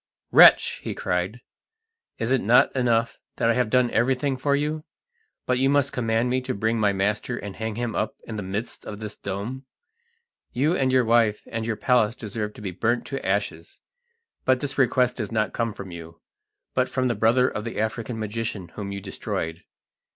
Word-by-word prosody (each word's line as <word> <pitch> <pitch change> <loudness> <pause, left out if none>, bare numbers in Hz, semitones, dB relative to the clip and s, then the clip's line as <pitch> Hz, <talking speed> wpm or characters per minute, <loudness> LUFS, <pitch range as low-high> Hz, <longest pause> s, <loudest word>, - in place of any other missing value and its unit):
"Wretch!" - - +7
he - - -4
cried, 90 +7 -2 0.8
"is 115 +2 -2
it 135 - +3
not 115 +6 +4
enough 115 -3 +1 0.2
that 115 - +2
I - - +3
have 125 -2 +1
done 125 0 +3
everything 130 +3 +1
for 140 +2 +1
you, 150 +2 -1 0.6
but 125 0 +1
you 135 +1 +3
must 140 0 +2
command 115 0 +1
me 130 +1 +1
to 130 0 -3
bring 110 +3 0
my 105 -2 +3
master 105 +5 -1
and 100 -2 -7
hang 110 -1 -4
him 120 -1 -3
up 110 - -1
in 110 - -6
the 105 - -3
midst 100 +5 -5
of 105 -1 -7
this 105 -1 -6
dome? 125 +8 -5 0.9
You 150 +8 +2
and 130 -6 +1
your 130 -2 +4
wife 115 -2 +3
and 115 0 -3
your 115 - 0
palace 120 -3 +2
deserve 105 -2 -5
to - - -11
be 95 -3 -4
burnt 115 +7 0
to 135 0 -4
ashes; 95 -4 -2 0.6
but 130 -1 +3
this 140 0 -4
request 125 -1 +2
does 110 -3 -4
not 110 -1 0
come 115 -1 -1
from 100 -2 -9
you, 85 -1 -10 0.5
but 125 0 +1
from 130 -1 0
the 120 - +1
brother 120 +3 +3
of 105 - -3
the 115 -1 -5
African 115 +2 -2
magician 110 -4 -4
whom 100 +3 -6
you 100 0 -5
destroyed. 85 -3 -4
115 Hz, 195 wpm, -25 LUFS, 105-125 Hz, 0.9 s, Wretch